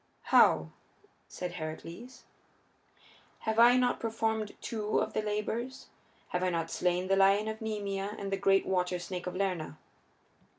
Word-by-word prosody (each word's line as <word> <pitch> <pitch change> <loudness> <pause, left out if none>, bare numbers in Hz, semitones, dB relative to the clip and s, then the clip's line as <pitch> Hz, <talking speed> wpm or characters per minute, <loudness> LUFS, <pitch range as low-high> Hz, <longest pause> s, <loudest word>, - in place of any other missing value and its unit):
"How?" 80 0 +5 0.6
said 180 -1 -5
Heracles. 170 +9 -8 1.2
"Have 220 0 0
I 240 +2 +7
not 250 -1 +2
performed 220 -1 -2
two 215 -2 -2
of - - -2
the - - 0
labors? 215 +5 -3 0.4
Have 180 - -1
I 185 - +2
not 165 -2 -2
slain 180 +1 0
the 195 - +3
lion 195 +2 +4
of 220 0 -5
Nemea 205 -2 -3
and 195 -1 -5
the 195 - 0
great 195 0 +3
water 180 -1 0
snake 180 +1 -6
of 180 - -4
Lerna?" 180 -6 -2
195 Hz, 145 wpm, -31 LUFS, 180-220 Hz, 1.2 s, I